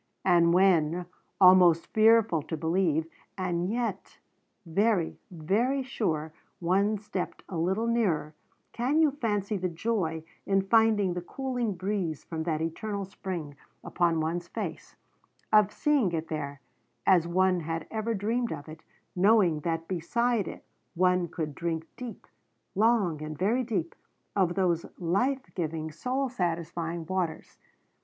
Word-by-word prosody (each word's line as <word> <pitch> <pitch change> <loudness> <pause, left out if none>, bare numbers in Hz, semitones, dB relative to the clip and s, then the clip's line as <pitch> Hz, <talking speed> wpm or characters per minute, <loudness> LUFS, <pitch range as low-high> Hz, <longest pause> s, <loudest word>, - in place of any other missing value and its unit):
And 170 -2 +5
when, 175 -2 +3 0.3
almost 180 -3 +7
fearful 220 -6 +5
to 160 +2 -5
believe, 160 -1 +1 0.3
and 180 -1 -1
yet 225 -4 -3 0.5
very, 195 +1 +1
very 210 - 0
sure, 160 -12 -2 0.3
one 195 +5 +2
stepped 205 -3 -5
a 185 - -7
little 190 +7 0
nearer, 190 -11 0 0.4
can 260 +6 +1
you 310 -3 +5
fancy 210 -6 -1
the 185 -1 -1
joy 165 -3 -2 0.2
in 195 -1 +2
finding 215 -2 +3
the 180 - -3
cooling 245 +1 -3
breeze 185 -4 -2
from 160 -1 -5
that 160 -2 -1
eternal 200 +5 -3
spring 175 -6 -6 0.3
upon 170 -2 +1
one's 170 +2 -2
face, - - -6 0.6
of 210 -1 +6
seeing 285 -11 +2
it 165 0 -3
there 145 -3 -4 0.4
as 175 -3 +4
one 185 +1 +2
had 165 0 -4
ever 220 +1 -1
dreamed 230 +4 -1
of 145 -1 -6
it, 155 0 -10 0.3
knowing 185 -4 +4
that 165 +1 -2
beside 220 +5 0
it - - -8 0.3
one 180 0 +3
could 160 -3 -4
drink 165 0 -3
deep 240 -6 -8 0.5
long 200 -7 +2
and 155 0 -6
very 225 - +1
deep 190 -9 -2 0.4
of 180 -3 +2
those 175 -3 +1
life 250 +11 0
giving, 160 -2 -3
soul 255 - -1
satisfying 170 -5 -3
waters? 180 -2 -3
185 Hz, 135 wpm, -28 LUFS, 165-215 Hz, 0.6 s, almost